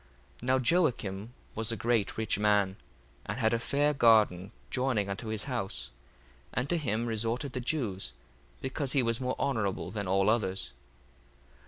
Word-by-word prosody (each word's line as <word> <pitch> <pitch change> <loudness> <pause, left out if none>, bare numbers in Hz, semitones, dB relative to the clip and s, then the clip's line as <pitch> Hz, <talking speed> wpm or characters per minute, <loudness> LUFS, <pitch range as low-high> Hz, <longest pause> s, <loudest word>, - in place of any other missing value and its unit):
1:4 120 - -7
Now 130 0 +4
Joacim 120 - +1 0.2
was 110 +1 0
a 115 - -2
great 115 -1 +1
rich 110 -2 0
man, 105 -2 +3 0.5
and 105 - -3
had 110 -2 +2
a 115 - +2
fair 145 +4 +2
garden 110 -7 +4 0.2
joining 125 -6 +1
unto 105 +4 -4
his 110 -1 -1
house: 120 - -3 0.6
and 125 +2 -1
to 175 - +3
him 115 -5 -1
resorted 115 +4 -1
the 130 - -2
Jews; 115 - -1 0.5
because 135 0 -1
he 135 -3 +3
was 115 +1 0
more 130 0 -1
honourable 100 -9 -1
than 100 -1 -3
all 95 +1 +3
others. 100 - -1
115 Hz, 160 wpm, -30 LUFS, 100-130 Hz, 0.6 s, Now